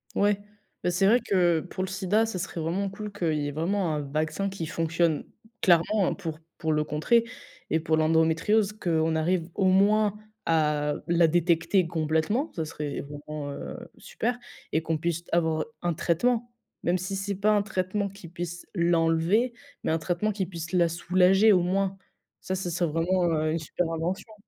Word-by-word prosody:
Ouais. 205 0 +3 0.4
Bah, 180 - +1
c'est 195 +2 +3
vrai 235 +4 +5
que 175 -4 +2
pour 185 +2 -5
le 190 - -3
sida, 195 +3 +1
ce 220 -5 -4
serait 170 -1 -4
vraiment 185 +5 -1
cool 210 +2 -7
qu'il 175 -6 -1
y 145 - -1
ait - - -3
vraiment 170 +2 0
un 150 - -2
vaccin 155 +7 -2
qui 190 -4 -5
fonctionne 165 -1 0 0.4
clairement 180 +2 +3
pour 160 -1 -6 0.2
pour 160 -2 0
le 150 0 +2
contrer 155 +11 +2 0.5
et 160 - +3
pour 160 -1 +1
l'endométriose, 165 +6 +3
qu'on 165 -5 0
arrive 170 +1 0
au 195 - +1
moins 205 +2 +4 0.3
à 150 -2 +2
la 170 -1 +4
détecter 170 +2 +2
complètement, 160 - 0
ça 160 - -2
serait 150 -2 -4
vraiment, 145 0 -7
heu, - - -6 0.2
super 245 0 -3 0.3
et 160 - +1
qu'on 160 0 -1
puisse 170 +1 -2
avoir 160 -2 +1 0.2
un 175 -1 0
traitement. 235 +10 0 0.3
Même 175 +2 +2
si 185 +2 -4
c'est 200 +1 -2
pas 205 +3 +2
un 210 -1 +4
traitement 200 0 -1
qui 200 -2 -12
puisse 175 0 -6
l'enlever, 170 +6 +2 0.3
mais - - 0
un 160 - +2
traitement 180 +6 -1
qui 195 -2 -2
puisse 170 -3 -7
la 175 -2 +4
soulager 185 +5 +4
au 180 - +4
moins. 195 +2 0 0.4
Ça 190 - -2
ce 185 -1 -3
serait 175 0 0
vraiment, 175 +3 +1
heu, 155 0 +1
une 165 - 0
super 165 +2 -2
invention. 180 +7 -3
175 Hz, 180 wpm, -27 LUFS, 160-195 Hz, 0.5 s, vrai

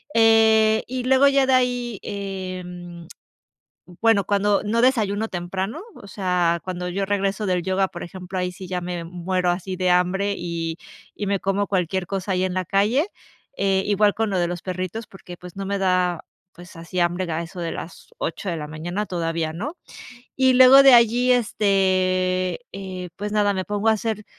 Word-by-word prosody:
Eh, 220 -1 +5
y 255 0 -4
luego 265 +2 +5
ya 275 -1 +3
de 260 - +3
ahí, 245 -3 0
em, 180 -3 -6 1.0
bueno 225 -4 +4
cuando 205 +1 +1
no 230 +3 +1
desayuno 220 -4 +1
temprano, 190 - -4
o 200 - -12
sea, 180 -3 0
cuando 180 -1 -4
yo 195 +2 -2
regreso 200 +1 -1
del 180 -2 0
yoga, 190 +1 0
por 175 - -9
ejemplo, 185 +1 -7
ahí 180 0 -2
sí 185 +1 -9
ya 180 -1 -2
me, 175 -1 -5
mm, - - -9
muero 180 0 -1
así 185 +1 -3
de 185 0 +1
hambre 190 +3 +1
y 165 -1 -4 0.4
y 205 - -4
me 200 -1 0
como 195 +1 0
cualquier 185 -1 -1
cosa 195 0 -3
ahí 185 0 +1
en 185 -1 -2
la 185 0 -1
calle. 215 - +1 0.5
Eh, 195 -1 +1
igual 205 0 +3
con 220 -2 -1
lo 190 - 0
de 175 - +1
los 175 0 -5
perritos, 185 +4 -4
porque 180 -2 -12
pues 180 +1 -12
no 195 -1 -4
me 200 0 -1
da, 180 -2 +1 0.3
pues, 175 +1 -14
así 170 +2 -7
hambre 175 0 0
a 165 +2 -2
eso 175 +2 -8
de 170 - -3
las 165 - -9
8 185 +4 -4
de 170 - -2
la 150 0 -6
mañana, 175 +7 -4
todavía 165 -2 -2
no. 290 - -5 0.6
Y 260 -1 +4
luego 260 +2 +9
de 270 -2 +8
allí, 240 +2 +4
este, 185 -4 +1
eh, 185 -2 -6
pues 210 +1 -4
nada, 205 -1 +2
me 185 -1 -2
pongo 210 +1 -1
a - - +6
hacer 215 -1 -3
190 Hz, 190 wpm, -23 LUFS, 180-210 Hz, 1.0 s, luego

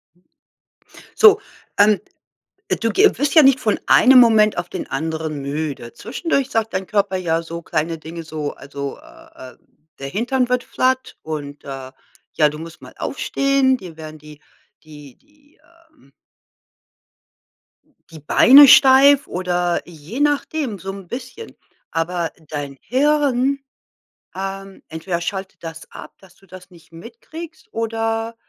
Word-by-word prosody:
Mhm. 175 - -33 0.9
So, 425 -1 +7 0.4
ähm, 205 0 +4 0.8
du 230 - +1
ge 405 - +3
wirst 290 +4 -1
ja 315 - +8
nicht 265 -1 +5
von 215 -4 0
einem 255 +1 +7
Moment 220 -3 +4
auf 175 - -4
den - - -6
anderen 155 0 -4
müde. 140 -4 -5
Zwischendurch 270 +3 -2
sagt 225 0 -2
dein 185 0 -3
Körper 200 -2 0
ja 165 -2 -1
so 170 0 -8
kleine 165 +1 -2
Dinge 165 +1 -9
so, 155 -2 -5
also, 140 0 -7
äh, 130 0 -15
äh, - - -27 0.4
der 135 - -6
Hintern 250 - -1
wird 250 0 0
flat 260 0 -1
und, 145 -2 -7
äh, 135 -1 -8 0.5
ja 150 -1 +4
du 150 - -9
musst 165 +1 -11
mal - - -13
aufstehen 275 -1 0
die 180 -7 -11
werden 155 -1 -10
die 150 0 -15 0.4
die 150 -4 -14
die 295 +1 -31 0.4
ähm 140 - -26 2.0
die 160 -1 -12
Beine 270 - +7
steif 275 +1 +6
oder 175 -1 -1
je 170 - -9
nachdem 290 -5 -1
so 190 +2 -6
'n 195 -2 -11
bisschen. 260 - -9 0.4
Aber 165 0 -2 0.2
dein 145 -2 -6
Hirn 275 0 +1 0.8
ähm, 195 0 -7
entweder 170 +2 -4
schaltet 190 +1 -6
das 165 0 -9
ab, - - -11
dass 185 -2 -20
du 195 - -24
das 185 0 -14
nicht 170 -2 -19
mitkriegst, 250 - -11
oder 225 0 -2
195 Hz, 140 wpm, -20 LUFS, 160-255 Hz, 2.0 s, ja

